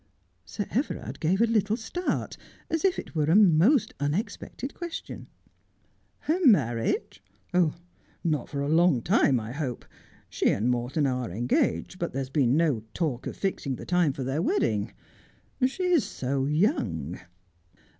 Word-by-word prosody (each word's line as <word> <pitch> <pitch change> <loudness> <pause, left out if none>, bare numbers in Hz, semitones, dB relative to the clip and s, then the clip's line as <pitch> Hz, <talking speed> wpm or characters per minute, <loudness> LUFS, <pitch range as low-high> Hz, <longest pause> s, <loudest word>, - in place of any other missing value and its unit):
Sir 205 - -4
Everard 260 +7 -2
gave 180 +6 +1
a - - +6
little 220 -1 +1
start, 350 +11 -3 0.4
as 325 - 0
if 385 -1 +2
it - - -7
were 155 -3 +1
a 165 - +5
most 210 - +5
unexpected 200 - -3
question. 345 -1 -7 0.5
' - - -41
Her 345 +5 +1
marriage! 140 - +2 1.0
Not 150 -6 -1
for 140 - -3
a 140 - -1
long 160 -5 +3
time, 160 - +3
I 110 +1 -6
hope. 135 -3 -4 0.4
She - - +1
and 115 +5 +1
Morton 125 +5 0
are 125 -4 -1
engaged, 120 - 0
but 170 - -3
there 135 - -2
has 130 0 -6
been 135 -1 +3
no 155 -8 +2 0.2
talk 150 -8 -2
of - - -6
fixing 155 -8 -2
the - - -9
time 175 -4 +2
for 135 0 -5
their 135 +5 -1
wedding. 380 - 0 0.8
She 320 +8 -5
is 355 -6 +3
so 135 +1 -2
young.' 110 - 0
160 Hz, 155 wpm, -27 LUFS, 130-220 Hz, 1.0 s, a